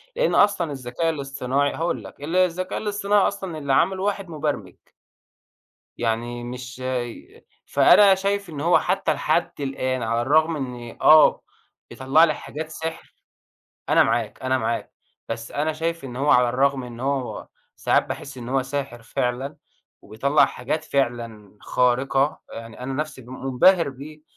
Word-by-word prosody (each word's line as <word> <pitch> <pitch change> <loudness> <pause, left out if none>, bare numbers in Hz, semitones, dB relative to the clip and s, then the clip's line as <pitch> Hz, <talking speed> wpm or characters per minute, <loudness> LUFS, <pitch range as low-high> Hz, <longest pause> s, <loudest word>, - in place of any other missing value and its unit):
لأن - - +1
أصلًا 195 -6 +3
الذكاء 135 +4 -2
الاصطناعي 140 -2 -1
هاقول 160 -8 -2
لك 95 +8 -12
ال 160 +4 -3
الذكاء 185 0 +1
الاصطناعي 205 -1 +1
أصلًا 190 -5 -5
اللي 140 -3 -1
عمله 185 +7 +2
واحد 200 -2 -2
مبرمج. 150 -2 -3 1.2
يعني 120 +1 -2
مش 125 +1 -8
ي 125 -2 -5 0.2
فأنا 200 -2 +6
شايف 200 0 -2
إن 150 -3 -6
هو 170 +3 +4
حتى 185 -3 0
لحد 155 0 -1
الآن 130 -2 -2
على 115 +1 0
الرغم 155 +6 +3
من 135 -5 -4 0.2
إن - - -17
آه 155 0 +7 0.5
بيطلّع 135 +5 +3
لي 160 -2 +4
حاجات 155 +1 -7
سحر، 160 0 -6 0.8
أنا - - +5
معاك، - - -1
أنا 130 0 +1
معاك، 115 0 -3 0.4
بس 115 0 -5
أنا 155 +2 0
شايف 165 0 -3
إن 125 -2 -7
هو 140 +3 +1
على 125 -1 +5
الرغم 135 +2 +1
إن 120 -1 -9
هو 135 -1 -3 0.3
ساعات - - +2
باحس 135 -2 -7
إن 120 -1 -7
هو 135 +1 +1
ساحر 135 -3 -5
فعلًا 125 +5 -3 0.5
وبيطلّع 140 +7 +2
حاجات 150 +5 -4
فعلًا 115 -8 -3
خارقة، 135 +3 +1
يعني 115 +1 -9
أنا 130 +1 -4
نفسي 150 -2 -4
م 130 +2 -10
منبهر 160 +6 +4
بيه، 145 +3 -10
140 Hz, 155 wpm, -23 LUFS, 125-160 Hz, 1.2 s, آه